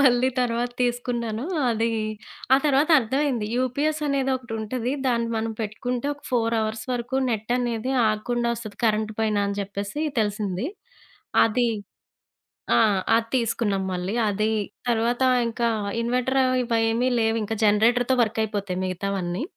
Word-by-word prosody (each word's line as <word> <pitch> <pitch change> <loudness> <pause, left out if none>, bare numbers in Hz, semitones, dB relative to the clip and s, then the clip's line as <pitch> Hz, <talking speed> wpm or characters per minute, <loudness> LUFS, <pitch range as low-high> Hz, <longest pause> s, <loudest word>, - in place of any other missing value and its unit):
మళ్ళీ 255 -2 +4
తరువాత 240 0 0
తీసుకున్నాను. 240 -1 -1 0.3
అది 225 0 +1 0.7
ఆ! - - +7
తరువాత 290 +2 +3
అర్థమైంది. 255 -2 0
యూపీఎస్ 280 +5 0
అనేదోకటుంటది, 255 -3 -1
దాన్ని 235 -2 +1
మనం 225 0 -1
పెట్టుకుంటే 240 +4 -3
ఒక 290 - -23
4 230 -2 +1
అవర్స్ 220 0 -3
వరకు 245 +1 -2
నెట్ 220 +1 -2
అనేది 240 0 -2 0.2
ఆగకుండా 235 +3 -1
ఒస్తది. 215 -3 -9
కరెంట్ 215 0 +1
పోయినా 215 -2 +1
అని 200 - -3
జెప్పేసి 200 +8 -4 0.2
తెలిసింది. 205 0 -1 0.8
అది 240 +2 +2 1.1
ఆ! - - +5 0.4
అది 230 0 0
తీసుకున్నాం 220 -4 0
మళ్ళీ, 180 +3 -3
అది 215 +2 0 0.4
తరువాత 235 +2 +1 0.3
ఇంకా 235 +1 0 0.3
ఇన్వర్టర్ 250 +3 0
అవి 255 0 +2
వా 230 - +3
ఏమి 240 +3 +1
లేవింకా 225 -1 0
జనరేటర్‌తో 235 +5 +3
వర్కయిపోతాయి 210 -4 -1
మిగతావన్నీ. 185 +1 -2
230 Hz, 125 wpm, -24 LUFS, 215-250 Hz, 1.1 s, ఆ